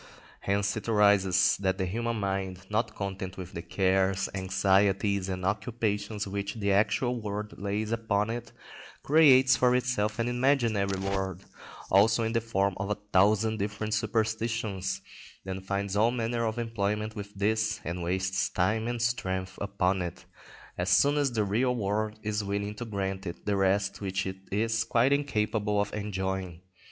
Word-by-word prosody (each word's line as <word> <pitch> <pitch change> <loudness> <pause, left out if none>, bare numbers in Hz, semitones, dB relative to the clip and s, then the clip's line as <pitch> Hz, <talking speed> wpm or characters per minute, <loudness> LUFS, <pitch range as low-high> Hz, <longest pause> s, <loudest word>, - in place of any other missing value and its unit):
Hence 100 0 0
it 110 +1 -5
arises 95 -3 +4
that 95 -1 +1
the 95 - -1
human 115 +5 -2
mind, 95 -2 -3
not 110 0 0
content 95 -2 -5
with 90 -1 -8
the 85 - -4
cares, 95 +2 +1
anxieties, 95 +1 +2
and 90 -1 -3
occupations 105 0 -1
which 100 +1 -4
the 100 -3 0
actual 110 +5 +1
world 105 -1 -5
lays 105 +2 -2
upon 110 -2 0
it, 120 -1 -6 0.5
creates 135 -4 +6
for 125 0 +3
itself 115 -4 0
an 115 0 0
imaginary 120 -6 +1
world 95 -1 -3 0.5
also 110 +4 +5
in 110 0 -1
the 115 - +2
form 100 -3 0
of 95 +1 -3
a 105 - 0 0.2
thousand 110 +3 +3
different 105 +1 -2
superstitions, 110 -3 -1 0.4
then 95 0 -5
finds 100 +1 -2
all 110 +3 +4
manner 115 -1 -1
of 110 +1 -3
employment 110 -2 -2
with 100 -1 -8
this, 110 +2 0
and 85 +2 -4
wastes 95 +2 0
time 110 +5 0
and 120 -1 -2
strength 95 -5 -1
upon 95 -2 0
it, 85 -1 -6 0.5
as - - 0
soon 145 +1 +4
as 145 -3 +1
the 110 -3 +1
real 120 +6 +1
world 105 0 -1
is 105 0 -1
willing 100 +1 -2
to 115 +3 -6
grant 95 -3 -3
it 85 - -7
the 105 - +1
rest 100 +1 +1
which 95 0 -2
it 95 0 -4
is 110 +2 +1
quite 120 +3 +3
incapable 105 -7 0
of 105 0 -1
enjoying. 95 -4 -3
105 Hz, 160 wpm, -28 LUFS, 95-110 Hz, 0.5 s, creates